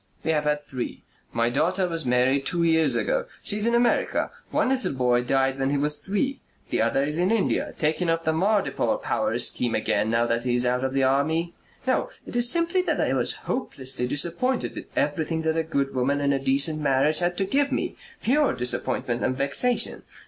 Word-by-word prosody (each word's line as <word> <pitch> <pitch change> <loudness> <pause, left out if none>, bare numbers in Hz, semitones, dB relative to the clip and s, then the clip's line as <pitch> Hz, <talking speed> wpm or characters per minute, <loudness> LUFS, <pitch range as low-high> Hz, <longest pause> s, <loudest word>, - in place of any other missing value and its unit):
We 160 - +1
have 150 -1 0
had 150 0 0
three. 125 -2 -6 0.3
My 115 +1 +1
daughter 180 +8 +1
was 165 -5 -2
married 125 +3 +2
two 170 -2 0
years 160 -1 +3
ago. - - 0 0.2
She 210 0 0
is 215 - -1
in 235 - +2
America. 240 0 +1 0.2
One - - +1
little 260 - 0
boy 125 -2 +2
died 135 +1 +1
when 135 0 +1
he 145 - +1
was 150 +1 +1
three. 205 - -2 0.3
The - - +1
other 135 - +2
is 150 +3 -2
in 180 +2 +2
India, 225 -3 0
taking 160 +3 0
up 165 0 0
the 160 - +2
Mardipore 195 +5 +1
power - - -1
scheme 120 -2 +1
again 105 0 0
now 115 +1 +2
that 115 0 -1
he 125 -1 0
is 125 0 +1
out 125 +1 +1
of 130 0 -1
the 135 0 +1
army.... 160 +6 +1 0.3
No, - - +1 0.2
it - - -6
is 240 0 +3
simply 340 +5 +2
that 365 - -1
I - - +1
was - - +1
hopelessly 130 - -1
disappointed 170 - -1
with - - -7
everything 160 +2 -1
that 160 0 0
a 165 - +2
good 140 -4 -2
woman 135 +2 0
and 140 0 +1
a 135 - 0
decent 140 +3 0
marriage 140 +2 +2
had 175 0 -1
to 195 - +1
give 280 +7 +1
me. - - -2 0.3
Pure 290 +4 +2
disappointment 120 0 -1
and 130 0 0
vexation. 140 - +1
150 Hz, 205 wpm, -25 LUFS, 135-185 Hz, 0.3 s, years